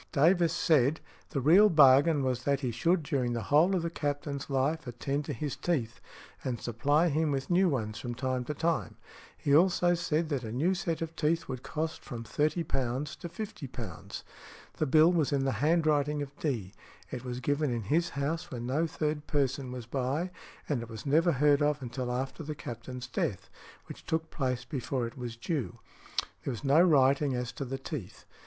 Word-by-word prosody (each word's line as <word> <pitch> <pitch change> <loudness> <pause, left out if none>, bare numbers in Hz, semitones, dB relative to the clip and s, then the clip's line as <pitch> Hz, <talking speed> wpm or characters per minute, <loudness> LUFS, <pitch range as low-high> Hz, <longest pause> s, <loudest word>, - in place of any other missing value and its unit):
Davis 170 +3 +4
said, 150 -1 +3 0.3
the 140 - -2
real 175 +10 +6
bargain 145 -1 +6
was 125 -1 -1
that 140 0 +1
he 125 -3 -1
should 165 +8 +1
during 135 -5 0
the 115 -1 -2
whole 170 +6 +5
of 175 - 0
the 170 - -1
Captain's 145 -2 -3
life 140 +2 0
attend 140 +4 -2
to - - -4
his 150 -3 -3
teeth, 125 -10 -2 0.4
and 125 -3 -2
supply 145 +8 +2
him 155 +1 +1
with 135 +3 -2
new 180 +1 +4
ones 110 -7 -2
from 120 -1 -5
time 130 0 -1
to 150 +4 -4
time. 160 - -1 0.4
He 140 - +2
also 175 +1 +4
said 165 -2 0
that 140 -4 -1
a 110 - -5
new 155 +11 +1
set 170 -3 -2
of 165 0 -7
teeth 165 +1 0
would 130 -2 -5
cost 160 +3 -3
from 120 -5 -6
£30 150 +8 0 0.6
to 170 - -6
£50. 130 - -7 0.5
The 155 - 0
bill 155 +5 +6
was 160 -5 +1
in 140 -1 +1
the 135 - +2
handwriting 150 -2 +2
of 140 0 -10
D.; 115 - -2 0.4
it 125 -1 -5
was 125 -1 -4
given 145 +3 0
in 115 -2 -2
his 160 - +1
house 160 +5 -2
when 120 -5 -5
no 150 +7 +1
third 150 -1 -2
person 135 -3 0
was 125 -2 -6
by, 135 +8 -1 0.4
and 140 -6 0
it 115 - -8
was 110 -2 -8
never 165 +5 +3
heard 145 +1 +4
of 150 0 +2
until 125 -1 -4
after 130 +5 -3
the 155 0 -5
captain's 125 -1 -7
death, 110 - -3 0.3
which - - -11
took 160 0 -1
place 125 -3 -2
before 130 -1 -2
it 115 - -7
was 120 -2 -6
due. 125 -2 -3 0.7
There - - -3
was 120 - -6
no 140 +4 +5
writing 140 -4 +4
as 125 -1 -3
to 140 - -5
the 135 +1 -4
teeth. 135 - -7
140 Hz, 190 wpm, -30 LUFS, 125-160 Hz, 0.7 s, real